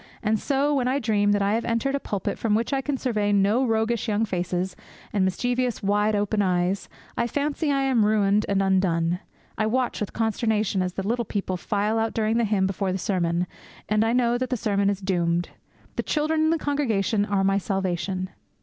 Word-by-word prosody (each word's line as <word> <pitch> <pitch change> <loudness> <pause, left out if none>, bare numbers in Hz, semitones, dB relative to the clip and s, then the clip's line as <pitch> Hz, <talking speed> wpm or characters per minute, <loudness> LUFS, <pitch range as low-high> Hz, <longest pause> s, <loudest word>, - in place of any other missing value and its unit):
And 215 0 +1
so, 285 +4 +1
when 260 -3 +1
I 260 +2 +1
dream 210 -5 +2
that 205 -1 +2
I 200 +1 +2
have 230 +1 0
entered 235 +4 0
a 280 - 0
pulpit 200 -8 -3
from 215 -2 +1
which 230 +5 -1
I 270 - +1
can 280 0 -2
survey 215 -6 0
no 205 +5 +3
roguish 225 -1 0
young 215 +1 +1
faces 180 -1 -2 0.4
and 200 -2 +2
mischievous 245 +6 -1
wide 205 +2 +2
open 205 +1 +1
eyes, 185 0 0 0.3
I 235 - 0
fancy 290 +3 -1
I 275 -1 +1
am 260 -5 +3
ruined 210 -1 +3
and 195 -1 +2
undone. 180 -3 +1 0.4
I 215 - +2
watch 250 +2 0
with 210 - -3
consternation 220 -3 0
as 180 -1 -2
the 195 +1 -4
little 235 +2 0
people 195 -3 -3
file 210 +4 0
out 225 0 -1
during 220 0 +1
the 235 - +2
hymn 200 -2 +1
before 195 0 -1
the 185 - -1
sermon, 175 -2 0 0.4
and 215 +1 +2
I 225 - +1
know 240 0 +2
that 255 - -2
the 250 - 0
sermon 200 -3 +1
is 200 -1 -2
doomed. 175 -2 0 0.5
The - - +2
children 310 +1 +1
in - - +3
the 330 - +2
congregation 230 -9 0
are 200 -1 0
my 195 +1 +2
salvation. 185 -1 -2
210 Hz, 205 wpm, -25 LUFS, 195-235 Hz, 0.5 s, no